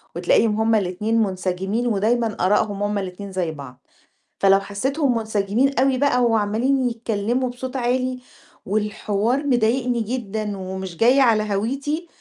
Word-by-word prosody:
وتلاقيهم 230 - +2
هُم 225 0 +3
الاتنين 210 +3 0
منسجمين 190 +3 -1
ودايمًا 225 +1 0
آراءهم 205 +1 +1
هُم 205 0 -1
الاتنين 195 +1 -6
زي 180 -3 -2
بعض. 135 -4 -11 0.5
فلو 195 0 +5
حسيتهم 250 +7 -1
منسجمين 220 +5 0
أوي 265 0 +3
بقى 250 -2 +2
وعَمَّالين 235 +4 +1
يتكلموا 230 +2 -1
بصوت 250 +1 -7
عالي، 255 0 -1 0.5
والحوار 210 +5 -1
مضايقني 245 -1 +1
جدًا 215 -3 -3
ومش 190 -2 -6
جاي 250 +7 +4
على 225 -4 +4
هَويتي، 280 - -2
220 Hz, 130 wpm, -22 LUFS, 200-250 Hz, 0.5 s, فلو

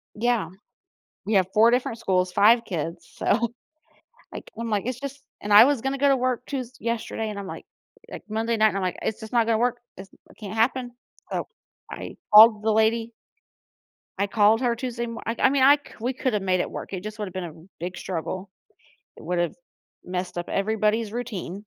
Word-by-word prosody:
Yeah. 230 -6 0 0.8
We 215 - 0
have 190 -2 +4
4 225 +2 +6
different 240 -2 0
schools, 185 -4 0
5 230 +5 +5
kids, 165 -2 -5
so, 235 +2 0 0.8
like, - - -9
I'm, 230 -1 -3
like, 210 0 -1
it's 250 0 -3
just 280 0 -7 0.2
and 210 - -5
I 210 +4 +10
was 280 -5 +1
gonna 270 +1 -2
go 280 +1 +3
to 270 - +5
work 250 -1 -1
Tues 255 -3 -4
yesterday, 225 -1 -3
and 205 - -6
I'm, 195 - -7
like - - -8 0.4
like, - - -8
Monday 225 +2 -1
night, 215 -1 +4
I'm, 195 - -1
like, 185 -1 -2
"It's 220 - -3
just 220 +1 -10
not 230 -2 +4
gonna 225 -1 +2
work, 245 +1 0 0.2
It's 190 +1 -9
it - - -22
can't 205 -1 -7
happen," 245 +2 +1 0.4
so - - -2 0.4
I - - -7 0.2
called 215 0 +9
the 220 - +2
lady 225 +1 +2 1.1
I 200 - +1
called 215 +2 +4
her 240 -2 +1
Tuesday 235 -1 -4
mor 230 0 -7
Iike, 230 +1 -3
I 265 - +5
mean 275 -1 +2
I 285 +2 +7
c - - -27 0.2
we 250 +2 0
coulda 245 -5 -1
made 185 -1 +1
it - - -1
work, - - -7
it 185 -2 -4
just 215 0 -7
would've 195 -3 -5
been 185 -1 -4
a 160 - -8 0.3
big 175 +1 -5
struggle. 185 +2 -5 0.7
It - - -13
would've 175 -1 -1 0.5
messed 180 0 -4
up 175 - -5
everybody's 215 +1 0
routine. 220 -8 -5
220 Hz, 200 wpm, -25 LUFS, 195-240 Hz, 1.1 s, I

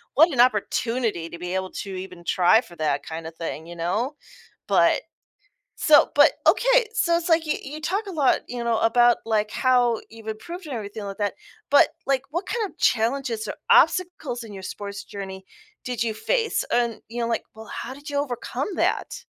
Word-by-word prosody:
what 320 +4 +6
an 260 - -3
opportunity 230 -5 +1
to 170 - -8
be 180 +1 -5
able 190 0 -2
to 195 - -6
even 185 -2 -8
try 180 +6 +4
for 175 - -15
that 150 -3 -1
kinda 160 0 -6
thing, 165 -1 -6
you 175 - -9
know. 210 - -1 0.5
But - - +3 0.7
so 300 -2 +5
but 290 +2 +7
okay - - +4
so, 370 -8 +2
it's, 340 +1 -2
like, 325 0 +5
y 305 - 0
you 295 +3 -7
talk 395 +7 -1
a - - -5
lot 295 -7 +2
you 245 -1 -4
know, 235 -1 +1
about 240 +1 +5
like, 215 -1 0
how 245 -3 +2
you've 225 -1 -11
improved 340 - -6
and 285 - -5
everything 210 -1 -6
like 200 -1 -6
that, 205 -1 0 0.4
but, 285 - +6 0.2
like, 270 -2 +1
what 345 +5 -3
kinda 445 -4 -2
challenges 230 -1 +1
or - - -3 0.2
obstacles 315 -9 +3
in 220 - -10
your 195 -1 -8
sports 200 +1 -6
journey 190 -1 -8 0.4
did 245 -3 -2
you 230 -1 -1
face, 455 - 0
and, 235 -1 +1
you 240 +2 -5
know - - 0
like 230 - 0
well 220 0 -10
how 260 - -6
did 285 +2 -10
you 285 - -1
overcome 260 - -3
that? - - -1
235 Hz, 190 wpm, -24 LUFS, 200-290 Hz, 0.7 s, but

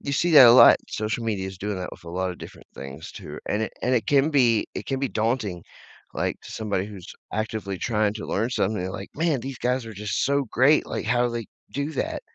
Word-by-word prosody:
you 140 - -4
see 175 +5 +1
that 135 -5 +10
a - - +9
lot. 130 - +9
Social 110 +2 -3
media 100 -4 -2
is 95 -1 -8
doing 105 0 -3
that 90 -1 -5
with - - -13
a 85 - -8
lot 95 +1 -2
of 90 - -9
different - - -12
things, 70 +3 -9
too, - - -9
and 105 +2 0
it - - -3
and 125 +1 +2
it 110 -4 0
can 145 +2 +3
be 120 -6 +3
it - - -6
can 135 -1 -1
be 135 -1 -1
daunting, 110 -6 -1 0.5
like, - - -2
to - - -11
somebody 105 -3 -2
who's 100 -4 -10 0.2
actively 110 -2 -3
trying 105 -2 0
to 105 - -6
learn 110 +4 0
something, 100 -5 -1
like, 100 - -7
"Man, 155 -4 0
these 135 0 -6
guys 125 0 0
are 110 - -7
just 105 0 -2
so 140 0 +1
great, 140 +5 +4
like, - - -4
how 120 +1 +2
do 120 - -3
they 115 -1 -3 0.3
do 140 +2 -3
that?" - - -3
110 Hz, 245 wpm, -24 LUFS, 100-130 Hz, 0.5 s, that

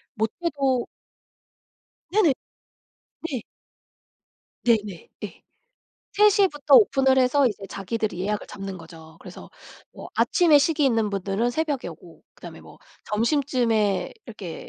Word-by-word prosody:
못해도 265 +2 -1 1.3
네네. 390 -9 +4 1.0
네. 255 -5 -3 1.2
네네. 210 -6 0 0.2
예. - - -9 0.7
3:00 405 -1 +4
부터 290 -2 +2
오픈을 270 -9 +5
해서 260 +2 +3
이제 210 -3 -3
자기들이 205 0 -4
예약을 210 +2 -2
잡는 195 -2 -7
거죠. 160 -1 -14
그래서 - - -12 0.4
뭐 - - -10
아침에 330 -5 +4
식이 300 0 +1
있는 225 -5 +1
분들은 200 +4 -1
새벽에 295 0 -2
오고 - - -14
그다음에 - - -11
뭐 - - -16 0.3
점심쯤에 230 -3 0
이렇게 205 -7 -9
235 Hz, 245 characters per minute, -24 LUFS, 205-285 Hz, 1.3 s, 오픈을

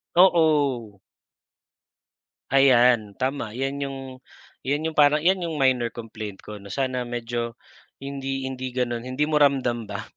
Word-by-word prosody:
Oo. 145 - +3 1.5
Ayan, 125 -6 +4
tama 130 -4 -3
'yan 135 +2 -2
yung 135 -1 -6 0.7
'yan 150 +3 0
yung 155 - -18
parang 150 0 +5
yan 190 +1 +3
yung 160 - -4
minor 130 -4 +2
complaint 110 -3 -8
ko 105 -1 -9
na 100 - -12
sana 130 -2 -1
medyo 120 -1 -4 0.5
hindi 135 -1 -4
hindi 130 -1 -5
gano'n 120 -2 -1
hindi 130 +3 -1
mo 155 - 0
ramdam 130 -5 +2
ba 100 +2 -5
130 Hz, 135 wpm, -24 LUFS, 120-140 Hz, 1.5 s, parang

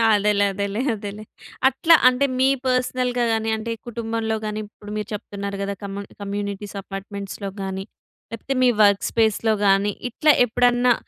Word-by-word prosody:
అదేలే. 205 0 +2
అదేలే. 200 +3 -2
అదేలే. 205 0 -7 0.5
అట్లా 320 +6 +5
అంటే 255 +2 +3
మీ 260 +1 +5 0.2
పర్సనల్‌గా 250 -1 0
గాని, 225 0 -1
అంటే 225 +1 -4 0.2
కుటుంబంలో 225 -1 -2
గాని, 215 0 -3
ఇప్పుడు 205 0 -12
మీరు 210 - -3
చెప్తున్నారు 200 -1 -5
కదా! 200 0 -2
కమ్ 200 0 -5 0.2
కమ్యూనిటీస్ 200 0 -4
అపార్ట్‌మెంట్స్‌లొ 200 0 -6
గాని, 190 0 -4 0.5
లేపోతే 245 +4 -3
మీ 250 - +6
వర్క్ 200 -1 +4
స్పేస్‌లొ 220 -1 +2
గాని 195 +1 +3 0.2
ఇట్లా 305 +5 +4
ఎప్పుడన్నా 245 +1 +3
210 Hz, 140 wpm, -22 LUFS, 200-240 Hz, 0.5 s, మీ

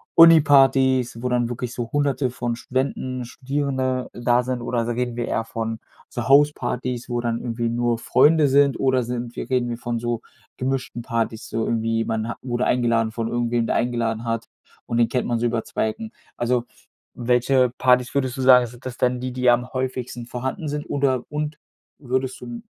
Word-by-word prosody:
Uni-Partys, 135 -6 +5
wo 125 - 0
dann 120 -1 +1
wirklich 120 0 -4
so 120 -2 -4
Hunderte 145 -2 +1
von 120 -1 -3
Studenten, 130 0 -2
Studierende 130 0 -2
da 120 +1 +2
sind, 125 0 -2
oder 120 0 -1
s 115 - -3
reden 120 0 -2
wir 120 0 -3
eher 115 - -1
von 115 0 -4 0.3
so 120 -2 -4
Hauspartys, 130 -3 +2
wo 120 0 -1
dann 115 -1 -1
irgendwie 115 -1 -2
nur 120 0 0
Freunde 150 +5 +4
sind, 140 0 +4
oder 130 -2 +2
sind 120 0 -5
wir - - -5
reden 125 -2 +1
wir 120 - -3
von 120 0 -3
so 120 0 -2 0.4
gemischten 130 -2 -3
Partys, 115 -2 -2
so 115 - -2
irgendwie 115 0 0
man 110 0 -2
ha - - -3
wurde 120 -1 -1
eingeladen 115 -2 +2
von 115 -1 -2
irgendwem, 120 0 0
der - - 0
eingeladen 115 -2 -1
hat, 115 0 -1 0.4
und 115 - -1
den 120 -1 +4
kennt 125 - -1
man 120 -1 0
so 120 - 0
über 115 -1 0
2 - - -1
Ecken? 220 - -7 0.3
Also, 120 0 0 0.5
welche 125 +1 +2
Partys 125 -1 +3
würdest 130 -3 0
du - - -2
sagen, 125 -1 +7
sind 120 +2 -15
das 130 -1 -6
denn, 125 0 +1
die 130 0 -3
die 125 0 +2
am 125 +1 +2
häufigsten 130 -2 -3
vorhanden 130 +6 -4
sind 145 0 -3
oder 135 -3 +1
und 150 +1 -3 0.4
würdest 130 -1 -2
du - - -8
'n 120 -1 -7
125 Hz, 190 wpm, -23 LUFS, 120-130 Hz, 0.5 s, sagen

